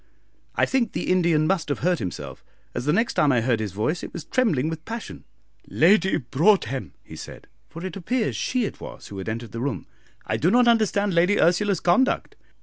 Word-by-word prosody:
I - - +3
think 245 -5 0
the - - -2
Indian 170 -4 +3
must 180 -2 0
have 145 - -2
hurt 180 -1 +2
himself, 90 -3 -6 0.3
as - - -4
the 150 - +2
next 225 +8 +1
time 145 - +3
I 125 -3 +2
heard 115 -1 +1
his 105 -3 -3
voice 110 - -1
it - - -7
was 170 - -7
trembling 160 - +1
with 160 0 -5
passion. 230 +4 -7 0.4
"Lady 190 +2 +3
Broadhem," 135 - +1
he - - -12
said - - -10 0.2
for 165 +3 -8
it 185 - -5
appears 220 +5 -1
she 255 -3 0
it - - -7
was - - -10
who 100 - -7
had 95 - -5
entered 115 0 -5
the 115 - -5
room 125 - -3 0.4
"I - - -1
do 165 - +2
not 245 +4 +4
understand 205 -4 +2
Lady 180 +5 +3
Ursula's 180 +2 +2
conduct. 220 +10 +1
170 Hz, 205 wpm, -24 LUFS, 135-205 Hz, 0.4 s, not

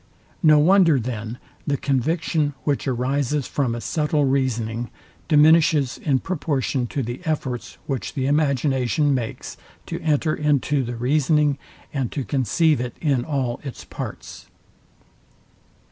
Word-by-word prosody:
No 155 -4 +6
wonder, 165 -2 +5
then, 115 -1 -5 0.3
the 140 -1 +1
conviction, 145 +2 0
which 145 -1 -1
arises 135 +2 0
from 130 -5 -1
a - - -4
subtile 150 0 0
reasoning, 120 -4 -1 0.4
diminishes 155 -3 +4
in 140 -3 +1
proportion 140 -6 -1
to 140 +2 -3
the 120 +5 -5
efforts, 145 -7 -3
which 135 -1 -4
the 130 -2 -1
imagination 140 -1 +1
makes 120 -4 -4 0.3
to - - -5
enter 155 0 +1
into 145 -1 +1
the 120 0 -4
reasoning, 145 +3 +2 0.3
and 135 -5 -2
to 140 - -2
conceive 140 - +1
it 125 -1 -5
in 140 -6 +1
all 130 -4 -2
its 135 -3 -8
parts. - - -8
140 Hz, 130 wpm, -23 LUFS, 125-150 Hz, 0.4 s, No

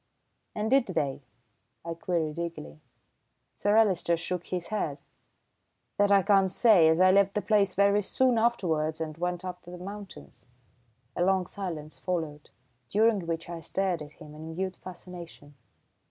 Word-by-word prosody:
"And 215 +2 -2
did 270 -3 +4
they?" 145 -7 -2 0.6
I 170 - -3
queried 165 -2 -2
eagerly. 120 - -6 0.7
Sir 205 +1 +1
Alister 185 -6 +3
shook 175 +1 -4
his 180 -2 -4
head. 165 -10 -2 1.0
"That 205 0 +3
I 200 -1 +5
can't 195 -1 +4
say, 190 -4 +5
as 160 +1 +3
I 185 0 +6
left 200 0 +3
the 210 - +1
place 200 -4 +2
very 200 +1 +4
soon 245 +3 +2
afterwards 165 -10 0
and 155 -1 -4
went 180 +1 -2
up 180 -1 -6
to - - -14
the 180 - -8
mountains." 200 -5 -10 0.7
A 175 - +1
long 190 0 +2
silence 170 -6 -6
followed, 160 -5 -4 0.4
during 210 -4 +2
which 165 0 -3
I 170 -1 -6
stared 180 0 -1
at 150 0 -9
him 150 - -13
in 160 +1 -8
mute 190 +1 -3
fascination. 175 -5 -11
180 Hz, 155 wpm, -28 LUFS, 165-200 Hz, 1.0 s, I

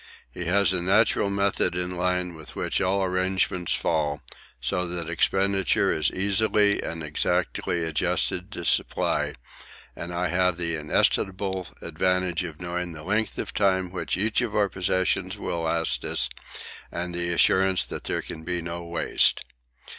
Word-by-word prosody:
He 90 +7 -6
has 95 +2 +3
a 90 - 0
natural 100 +2 +3
method 100 -2 0
in 90 0 -2
line 90 0 0
with 80 -2 -11
which - - -1
all 95 +1 +1
arrangements 95 -1 +1
fall, 75 -3 -1 0.4
so 90 +9 -1
that 85 -1 -4
expenditure 95 +2 +2
is 75 -2 +1
easily 100 +1 +2
and 85 0 -5
exactly 85 +2 0
adjusted 90 +4 -1
to 85 - -6
supply, - - +1 0.6
and 85 - -6
I 90 0 -1
have 90 -1 +2
the 85 -1 -1
inestimable 95 +4 0 0.2
advantage 90 +1 0
of 80 -4 -7
knowing 90 0 -3
the 80 -1 -9
length 105 +4 0
of - - -4
time 95 -3 +1
which 90 - -2
each 110 +5 +1
of 115 -3 -2
our 105 -2 +3
possessions 95 +1 0
will 85 -4 -3
last 80 0 0
us - - 0 0.6
and 90 0 -3
the 85 0 0
assurance 95 +2 +3
that - - -7
there - - -2
can 80 - -8
be 90 +1 -2
no 85 +1 -5
waste. 85 0 +2
90 Hz, 155 wpm, -26 LUFS, 85-95 Hz, 0.6 s, has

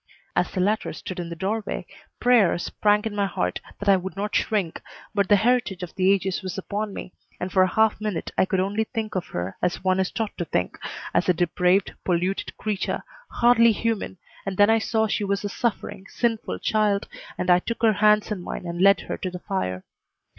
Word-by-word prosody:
As - - +2
the 190 - -4
latter 210 +4 0
stood 185 -1 -7
in 170 -1 -4
the 170 - -5
doorway 200 +5 -3 0.3
prayer 245 -9 +4
sprang 210 +4 +1
in 215 -2 -3
my 200 -1 +1
heart 90 - -2 0.2
that 205 - -7
I 195 -1 +6
would 185 +1 -6
not 205 +2 -3
shrink, 195 -7 0 0.3
but 200 -2 +1
the 205 - +7
heritage 220 -3 +1
of 175 - -7
the 190 +1 +3
ages 195 -1 0
was 185 0 -5
upon 205 +2 -3
me, 190 - -8 0.3
and 180 - -3
for 190 - +4
a 185 0 +3
half 220 -1 +2
minute 210 -6 -3
I - - +3
could 190 0 0
only 205 +4 0
think 220 -2 -4
of 185 -2 -2
her 90 +2 -4
as 180 - -1
one 185 0 +2
is 190 - +1
taught 225 -3 -3
to 175 - -1
think 90 - -2 0.3
as 180 - +2
a 180 - +4
depraved, 180 +3 +2
polluted 180 +2 -1
creature, 210 -3 -2 0.3
hardly 235 -1 +5
human, 225 -3 -2 0.3
and 195 -1 -4
then 205 +2 +6
I 225 - +4
saw 220 0 +1
she 215 -1 -1
was 200 0 -1
a - - -1
suffering, 200 -4 -3
sinful 230 -2 -1
child, 210 -2 +1 0.3
and 180 0 +1
I 175 - +6
took 230 +4 -5
her 220 -1 +6
hands 210 +1 +3
in 200 -4 -2
mine 175 - -6
and 170 0 -3
led 200 +1 +6
her - - -5
to 185 - -3
the 180 - -6
fire. 130 - -3
200 Hz, 215 wpm, -24 LUFS, 180-215 Hz, 0.3 s, the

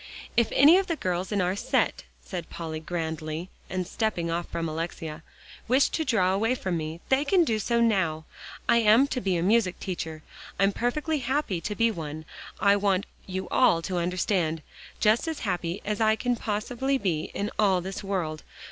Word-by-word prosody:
"If 235 -2 +4
any 310 +7 +7
of 390 - -2
the 335 - 0
girls 185 - -2
in 205 -2 +1
our 180 +1 +1
set," - - 0 0.2
said 175 -4 -6
Polly 160 -2 -5
grandly, 160 0 -4 0.2
and 185 -1 -2
stepping 180 -4 -1
off 170 +1 -2
from 165 -1 -2
Alexia, 160 0 -5 0.5
"wish 260 +4 +4
to 320 - -1
draw 190 -9 +2
away 225 +6 +1
from 190 -7 -2
me, 160 +1 -4
they 265 +2 +3
can 350 +4 +4
do 225 -8 0
so 235 +3 +1
now. 175 -9 +1 0.4
I - - +5
am 230 +3 +6
to 250 - -2
be 190 -4 +1
a 170 - 0
music 200 -2 +2
teacher; 160 -4 -5 0.3
I'm 195 +1 +3
perfectly 295 - -1
happy 260 - -1
to 210 - -3
be 230 +1 +3
one, 155 -4 -6 0.3
I 200 -1 +5
want 200 -1 +1 0.2
you 190 0 -4
all 170 -10 +4
to 185 0 -2
understand. 175 -2 0 0.4
Just 220 +8 +3
as 320 -2 -3
happy 180 -3 -2
as 210 +1 -2
I 220 0 +4
can 245 +2 0
possibly 240 +5 -1
be 170 -10 -1
in 205 +2 -2
all 195 -4 +4
this 190 +3 -6
world. 175 -6 -2
195 Hz, 185 wpm, -27 LUFS, 170-230 Hz, 0.5 s, any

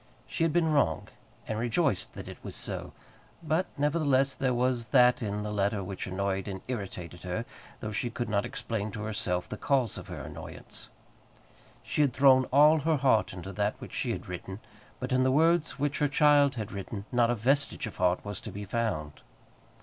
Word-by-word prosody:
She - - -5
had 165 - +3
been 160 -1 +2
wrong, 80 - +1 0.4
and 110 0 -2
rejoiced 120 - 0
that - - -7
it - - -9
was - - -7
so. - - -5 0.5
But 160 +3 +1
nevertheless 140 -2 +2
there 130 -1 0
was 125 -1 0
that 125 +1 +5
in 105 -1 -2
the 105 - -3
letter 100 0 0
which 95 0 -5
annoyed 95 +1 -2
and 95 -2 -5
irritated 95 -8 -5
her, 90 +6 -3 0.4
though 110 - -4
she 115 +3 -1
could 120 0 -3
not 100 -1 +1
explain 110 -2 -3
to 105 - -5
herself 90 -4 -1
the 110 - -6
cause 130 -5 +1
of - - -11
her - - -6
annoyance. - - -8 0.9
She - - 0
had 140 -4 +3
thrown 130 0 +6
all 150 +5 +6
her 155 +1 +2
heart 130 -5 +3
into 95 +1 -7
that 105 +2 0
which - - -9
she - - -1
had - - -3
written, 95 +2 -6 0.4
but 125 +1 -4
in 130 0 +3
the 130 - +3
words 165 +3 +3
which 145 +1 -1
her 145 - +3
child 145 -1 +4
had 110 -4 -4
written 100 +1 -6
not 120 -1 +3
a 120 - +2
vestige 135 +4 +1
of 110 - -8
heart 90 +1 +1
was 100 -2 -3
to - - -7
be 100 +1 -6
found. 100 -9 -2
115 Hz, 195 wpm, -29 LUFS, 100-140 Hz, 0.9 s, thrown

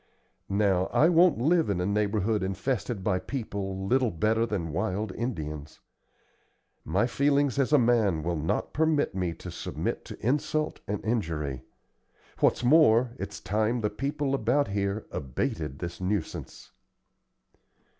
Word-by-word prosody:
Now, 100 -2 +2
I 160 - +4
won't 175 -2 +5
live 160 +5 +2
in 100 -3 0
a 90 - 0
neighborhood 105 +1 +1
infested 100 +2 -2
by 95 -2 +1
people 95 -6 -4
little 125 +3 +2
better 110 +6 +1
than 85 -8 -3
wild 95 +4 -1
Indians. 75 - -5 1.0
My 95 +9 +1
feelings 140 +2 +1
as 135 0 +1
a 150 - +7
man 115 - +2
will 85 +1 -1
not 80 +1 -2
permit 155 -1 +1
me 90 -3 -2
to - - -8
submit - - -4
to - - -9
insult 155 +3 0
and 105 0 -3
injury. 80 - -2 0.8
What's - - +2
more, 125 -4 +5
it's 100 +1 -5
time 110 +3 0
the 105 - 0
people 140 +4 -2
about 135 +1 +1
here 100 +1 -2
abated 70 +2 -3
this 85 +2 -6
nuisance." 95 -2 -4
105 Hz, 135 wpm, -28 LUFS, 95-130 Hz, 1.0 s, a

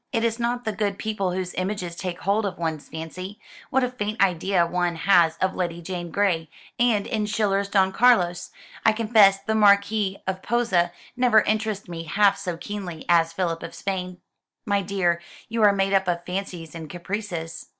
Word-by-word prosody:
It 230 -3 0
is 230 0 0
not 240 +1 -1
the 220 - 0
good 205 -1 -2
people 200 -4 -2
whose 185 -1 -3
images 185 -2 -3
take 180 -1 -5
hold 205 +3 +1
of 190 - -6
one's 160 -3 -4
fancy, 185 +5 -7 0.3
What 265 0 +2
a 250 - +1
faint 215 -2 -4
idea 185 -1 +2
one 175 0 -1
has 170 -2 +4
of 185 - 0
Lady 170 -2 -3
Jane 175 0 -5
Grey, 170 -5 0 0.3
And, 230 -4 +3
in 215 -1 -1
Schiller's 200 -2 0
'Don 190 -2 +3
Carlos,' 190 -7 +3 0.3
I 220 - +5
confess 215 -3 +5
the 220 - -1
Marquis 200 -1 +3
of 190 0 -3
Posa 200 -7 +1 0.2
never 240 -4 +5
interested 215 -2 -1
me 165 -1 -6
half 200 +5 +3
so 180 -4 -4
keenly 180 -3 -6
as 165 -1 +4
Philip 165 -1 -2
of 165 - -8
Spain." 185 -2 -4 0.5
"My 200 -2 +1
dear, 180 -3 0 0.3
you 230 0 -1
are 210 -1 +7
made 195 0 0
up 190 -1 +3
of 175 -1 -1
fancies 180 -3 -5
and 160 -2 -8
caprices. 175 -1 -5
195 Hz, 180 wpm, -24 LUFS, 175-210 Hz, 0.5 s, are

